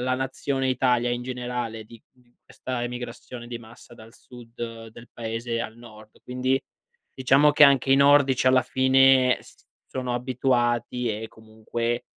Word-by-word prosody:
la 130 Hz, +1 st, 0 dB
nazione 135 Hz, +1 st, -2 dB
Italia 125 Hz, -1 st, +1 dB
in 120 Hz, 0 st, -2 dB
generale 125 Hz, -3 st, -5 dB
di 115 Hz, +1 st, -15 dB, 0.4 s
questa 125 Hz, -2 st, -6 dB
emigrazione 120 Hz, 0 st, -7 dB
di 120 Hz, -1 st, -6 dB
massa 115 Hz, +1 st, -15 dB
dal 115 Hz, 0 st, -15 dB
sud 115 Hz, -2 st, -10 dB
del 115 Hz, +2 st, -14 dB
paese 115 Hz, 0 st, -4 dB
al 110 Hz, -1 st, -6 dB
nord, 110 Hz, -2 st, -16 dB
quindi, 130 Hz, +1 st, -1 dB, 0.5 s
diciamo 135 Hz, +3 st, +4 dB
che 150 Hz, -, +4 dB
anche 135 Hz, -1 st, +4 dB
i 135 Hz, -, +5 dB
nordici 140 Hz, -2 st, +4 dB
alla 130 Hz, -1 st, +5 dB
fine 130 Hz, 0 st, +4 dB
s -, -, -19 dB, 0.2 s
sono 125 Hz, -1 st, -4 dB
abituati 125 Hz, -1 st, -1 dB
e -, -, -5 dB
comunque, 110 Hz, +2 st, -5 dB
125 Hz, 145 wpm, -24 LUFS, 115-130 Hz, 0.5 s, i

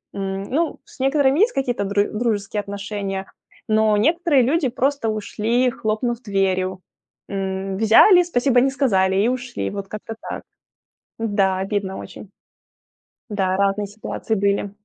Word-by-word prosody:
м, 195 Hz, 0 st, -3 dB
ну, 315 Hz, +9 st, -1 dB
с -, -, -18 dB
некоторыми 270 Hz, +2 st, +2 dB
есть 445 Hz, +4 st, +4 dB
какие-то 245 Hz, -6 st, -1 dB
дру 205 Hz, +1 st, +2 dB
дружеские 210 Hz, -2 st, -1 dB
отношения, 200 Hz, -1 st, -4 dB, 0.4 s
но 215 Hz, -1 st, +3 dB
некоторые 305 Hz, +1 st, +3 dB
люди 285 Hz, +2 st, +1 dB
просто 265 Hz, 0 st, 0 dB
ушли, 225 Hz, +4 st, 0 dB
хлопнув 235 Hz, 0 st, -2 dB
дверью. 190 Hz, -3 st, -1 dB, 0.5 s
М, 190 Hz, -1 st, -3 dB
взяли, 290 Hz, -, +7 dB
"спасибо" 250 Hz, -6 st, +2 dB
не 270 Hz, -, +3 dB
сказали 190 Hz, -9 st, +2 dB
и 235 Hz, -, +3 dB
ушли. 250 Hz, -1 st, -3 dB
Вот 200 Hz, -1 st, -5 dB
как-то 215 Hz, +2 st, -7 dB, 0.2 s
так. -, -, -5 dB, 0.8 s
Да, 200 Hz, -4 st, +1 dB
обидно 195 Hz, -1 st, -2 dB
очень. 195 Hz, -, -10 dB, 1.0 s
Да, 190 Hz, -2 st, 0 dB
разные 200 Hz, +1 st, +1 dB
ситуации 220 Hz, +2 st, -4 dB
были. 200 Hz, 0 st, 0 dB
215 Hz, 135 wpm, -21 LUFS, 195-255 Hz, 1.0 s, взяли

